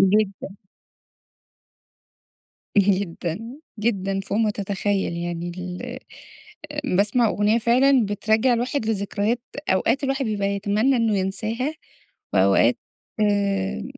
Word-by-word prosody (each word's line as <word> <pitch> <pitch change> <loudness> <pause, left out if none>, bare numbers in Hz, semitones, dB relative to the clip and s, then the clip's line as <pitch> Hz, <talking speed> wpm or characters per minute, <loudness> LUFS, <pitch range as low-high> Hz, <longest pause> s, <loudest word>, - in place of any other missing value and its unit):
جدًا. 195 0 +1 2.2
جدًا 185 -3 +1 0.4
جدًا، 195 -3 0
فوق 195 +2 -2
ما 220 -2 +3
تتخيَّل 200 -2 -1
يعني 175 0 -4
ال 185 +8 -6 1.0
باسمع 215 +3 +3
أغنية 210 +3 +2
فعلًا 245 +1 +4
بترجَّع 220 +4 +2
الواحد 245 +1 -1
لذكريات 210 +2 -1 0.3
أوقات 230 +9 +2
الواحد 270 0 0
بيبقى 205 -3 -1
يتمنّى 205 +6 +1
إنّه 225 -3 +2
ينساها، 220 +9 -2 0.6
وأوقات - - +4 0.4
آآ 200 -2 0
205 Hz, 95 wpm, -23 LUFS, 195-230 Hz, 2.2 s, فعلًا